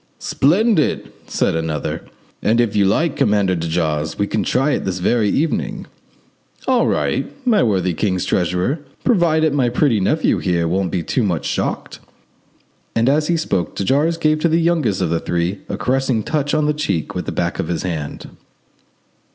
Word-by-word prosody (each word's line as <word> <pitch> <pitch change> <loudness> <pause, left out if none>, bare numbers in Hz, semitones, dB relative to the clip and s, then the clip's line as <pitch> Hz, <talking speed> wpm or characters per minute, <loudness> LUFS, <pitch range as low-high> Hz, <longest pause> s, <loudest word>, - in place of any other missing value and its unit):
"Splendid!" 185 - +1 0.2
said - - 0
another; 80 -2 -2 0.4
"and 115 +2 +2
if 120 -4 +1
you 100 -1 +4
like, 155 - +1
Commander 100 -3 +2
de 85 -1 -3
Jars, 80 -2 -1
we 100 - +1
can 110 - -1
try 135 +4 +1
it - - -1
this 95 -1 -2
very 105 +4 +1
evening." 155 +8 -1 0.8
"All - - +3
right, - - 0 0.2
my 225 -5 +4
worthy 95 -5 +1
king's 95 0 -1
treasurer, 90 - 0 0.2
provided 160 - +3
my 130 -4 +2
pretty 125 -2 +2
nephew 150 +12 +1
here 85 -2 0
won't 95 +2 0
be 85 0 -2
too 130 - -1
much 90 -8 -1
shocked," - - -3 1.0
and 115 +1 +2
as 150 +2 +2
he 170 - +1
spoke 95 - -2
de - - -2
Jars 150 - +2
gave 155 -2 +2
to 170 - +2
the 165 +1 +3
youngest 160 - +1
of 85 -3 0
the 85 - +1
three 90 +3 -2
a - - -3
caressing 130 -3 0
touch 150 -1 -1
on 155 -1 +2
the 150 - +2
cheek 100 - -2
with - - -4
the - - -1
back - - -2
of - - -1
his 85 -1 -2
hand. 80 -6 -5
110 Hz, 180 wpm, -19 LUFS, -, 1.0 s, you